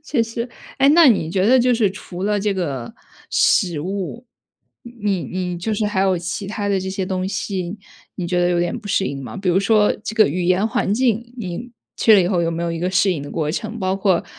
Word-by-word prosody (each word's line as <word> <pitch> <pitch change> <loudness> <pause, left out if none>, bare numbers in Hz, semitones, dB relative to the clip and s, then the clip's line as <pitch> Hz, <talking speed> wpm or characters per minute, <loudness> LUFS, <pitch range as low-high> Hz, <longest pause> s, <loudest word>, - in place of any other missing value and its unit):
确 280 -6 0
实， 230 +2 -4 0.3
哎 275 - +5
那 320 +1 +7
你 165 -8 +2
觉 190 +2 +1
得 255 +2 +6
就 250 0 +3
是 215 -4 +2
除 185 -2 -8
了 205 0 +1
这 205 -1 0
个 140 -10 -3 0.4
食 170 -5 +2
物， 195 - -4 0.8
你 195 -4 0
你 180 -1 -4
就 215 +4 -2
是 210 - -1
还 205 -2 -1
有 190 -1 +2
其 180 +4 -4
它 205 0 -3
的 195 -2 +1
这 190 - -4
些 190 0 -2
东 185 0 -2
西， 195 -1 -3 0.4
你 180 - -4
觉 180 0 0
得 175 - +3
有 175 -1 +1
点 175 0 -1
不 215 - -10
适 195 - +1
应 135 -1 -4
吗？ 130 - -8
比 195 -2 -3
如 185 +3 +3
说 210 0 +3
这 220 - -5
个 220 - +5
语 175 +4 -2
言 185 +4 +2
环 205 -2 0
境， 240 0 0
你 230 +3 -6 0.3
去 220 - +6
了 195 - +6
以 - - 0
后 180 -2 +1
有 165 - 0
没 170 +1 -3
有 170 -1 -1
一 165 - -4
个 180 +2 -1
适 190 +1 +3
应 145 -5 -4
的 145 - -8
过 155 -2 -1
程， 220 +7 -4
包 190 -1 0
括 190 -3 +1
190 Hz, 265 characters per minute, -20 LUFS, 175-215 Hz, 0.8 s, 那